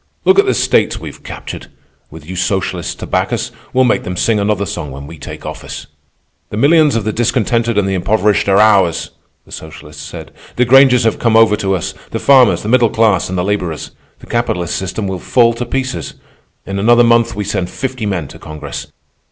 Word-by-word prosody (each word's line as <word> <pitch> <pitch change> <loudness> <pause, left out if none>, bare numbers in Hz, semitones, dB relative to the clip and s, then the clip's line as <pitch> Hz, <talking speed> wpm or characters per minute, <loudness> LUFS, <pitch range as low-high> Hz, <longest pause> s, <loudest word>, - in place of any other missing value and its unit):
"Look 190 +2 +5
at - - +3
the 130 - +2
states - - +1
we've - - -9
captured. - - -8 0.4
With 80 0 -13
you 95 - -6
socialists 90 -1 -2
to - - -8
back - - -1
us, - - -2 0.2
we'll 130 - +3
make 125 - +2
them 90 0 -5
sing 110 +2 +1
another 100 -1 0
song 75 -4 -5
when 70 +1 -9
we 80 +2 -11
take - - -9
office." - - -7 0.6
"The 105 - -5
millions 150 +3 +4
of 115 - 0
the 110 +1 -2
discontented 115 -1 0
and 100 -2 +2
the 95 - -1
impoverished 105 +2 +1
are 95 - +4
ours," 100 -6 +3 0.3
the - - -20
socialists 75 -1 -10
said. - - -9 0.2
"The 125 - +2
Grangers 130 -1 +6
have 110 -2 0
come 115 -2 +3
over 115 -2 +5
to 95 -2 0
us, 85 - -4 0.2
the - - -3
farmers, 135 -3 +4
the - - -5
middle 120 0 +4
class, 110 -6 +2
and 95 - -3
the 90 - 0
laborers. 90 -5 -3 0.3
The - - -15
capitalist 90 -7 -2
system 95 +3 -3
will 95 -1 -4
fall 115 +5 +3
to 120 +1 -5
pieces. 125 - -3 0.5
In 100 0 -4
another 120 +4 +5
month 115 -1 +3
we 105 - -3
send 95 -3 -2
fifty 130 -3 -4
men 90 -7 -2
to - - -13
Congress. 75 -1 -7
105 Hz, 205 wpm, -15 LUFS, 90-120 Hz, 0.6 s, Grangers